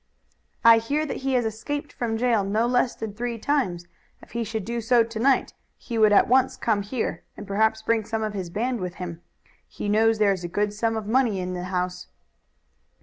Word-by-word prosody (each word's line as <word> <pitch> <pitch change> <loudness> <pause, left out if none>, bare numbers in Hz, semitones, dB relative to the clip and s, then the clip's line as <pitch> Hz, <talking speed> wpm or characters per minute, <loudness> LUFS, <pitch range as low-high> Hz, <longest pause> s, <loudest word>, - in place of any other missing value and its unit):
"I 230 0 +9
hear 285 +7 -1
that 300 - -4
he 270 0 -2
has 245 -2 +2
escaped 290 +7 -4
from 225 -2 -2
jail 230 -3 +2
no 210 +4 +1
less 245 0 +1
than 220 -2 -6
three 235 +2 -3
times. 210 -10 -1 0.3
If - - -17
he 235 +1 -2
should 220 -2 -4
do 235 +1 -3
so 235 +1 +4
to 225 -1 -6
night 265 +3 +2 0.2
he 230 -2 -4
would 215 -1 +6
at 205 - +5
once 260 +2 +3
come 215 -3 +1
here 220 +4 -3 0.2
and - - -8
perhaps 220 +2 +1
bring 225 0 +1
some 225 0 -2
of 215 -1 -2
his 190 -4 -4
band 240 +6 -2
with 180 -1 -5
him. 175 -2 -7 0.5
He - - -6
knows 220 +2 +3
there 205 -2 +3
is 185 -2 -6
a - - -2
good 205 +4 -1
sum 225 +1 -1
of 220 - -4
money 225 -3 +2
in 180 0 -3
the 180 0 -4
house." 180 0 -3
220 Hz, 215 wpm, -25 LUFS, 200-235 Hz, 0.5 s, I